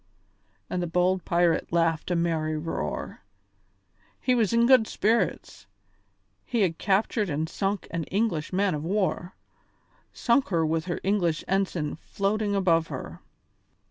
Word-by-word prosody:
and 180 - -2
the 175 - -2
bold 180 +2 +1
pirate 170 -1 +1
laughed 165 -1 +1
a 175 - +1
merry 160 -2 0
roar. 150 - -4 1.0
He 255 - +1
was 225 -5 +2
in 235 0 +4
good 245 -3 +5
spirits; 210 - -1 0.8
he 235 - -1
had 170 -4 +1
captured 205 +1 +1
and 155 +2 -1
sunk 195 +3 -2
an 165 -2 -2
English 190 -7 -1
man 195 0 +1
of 150 0 -3
war; 185 -1 -1 0.8
sunk 245 +2 +2
her 165 -4 +1
with 160 +1 -1
her 175 - -3
English 180 -5 +1
ensign 185 -6 -1
floating 200 +4 -1
above 165 -4 +2
her. - - -7
180 Hz, 140 wpm, -26 LUFS, 165-205 Hz, 1.0 s, good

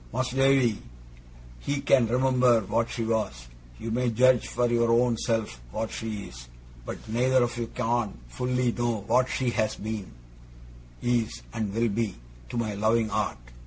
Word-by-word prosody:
Mas'r 130 0 -2
Davy, 135 -5 +3 0.8
he 140 - -2
can 135 -4 +4
remember 125 -1 +3
what 115 +4 0
she 115 - -3
was; 110 - -2 0.3
you 115 - -4
may 125 +2 +1
judge 125 +2 +4
for 125 - 0
your 115 0 +2
own 120 0 +3
self 110 - -2
what 110 0 -3
she 110 -3 -4
is; - - -11 0.4
but - - -4
neither 125 +3 +3
of 120 0 -2
you 120 -1 -3
can't 120 - -1
fully 125 - 0
know 120 -3 -1
what 130 +4 +3
she 125 -2 0
has 110 -2 0
been, 105 -2 -5 0.9
is, 120 -2 0
and 110 -4 -2
will 115 0 +2
be, 105 -2 -1 0.3
to - - -4
my 110 -3 -1
loving 110 +2 +1
art. - - -1
115 Hz, 160 wpm, -27 LUFS, 110-125 Hz, 0.9 s, can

